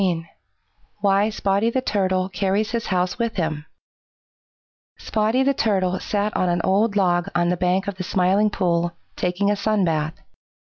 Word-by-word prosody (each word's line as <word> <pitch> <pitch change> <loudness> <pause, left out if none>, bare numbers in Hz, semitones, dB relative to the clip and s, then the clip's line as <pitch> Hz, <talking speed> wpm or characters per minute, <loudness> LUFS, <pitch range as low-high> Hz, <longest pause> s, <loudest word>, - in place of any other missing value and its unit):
XV 170 -4 0 0.8
WHY 200 +1 +3
SPOTTY 200 +1 +1
THE 255 +2 -1
TURTLE 190 -5 0
CARRIES 195 +3 0
HIS 235 -1 -2
HOUSE 180 +1 -1
WITH 230 -1 -1
HIM 160 -4 -2 1.3
Spotty 220 +4 0
the 275 +1 +2
Turtle 190 -6 0
sat 210 0 -2
on 180 - +1
an 175 0 +1
old 200 +3 +2
log 175 -3 +2
on 175 0 +2
the 180 - +1
bank 180 +2 0
of 200 -2 -4
the 185 - -4
Smiling 190 +3 +2
Pool, 175 -4 0 0.2
taking 185 +3 0
a - - +2
sun 205 -1 +1
bath. 155 -1 -1
190 Hz, 160 wpm, -22 LUFS, 180-210 Hz, 1.3 s, WHY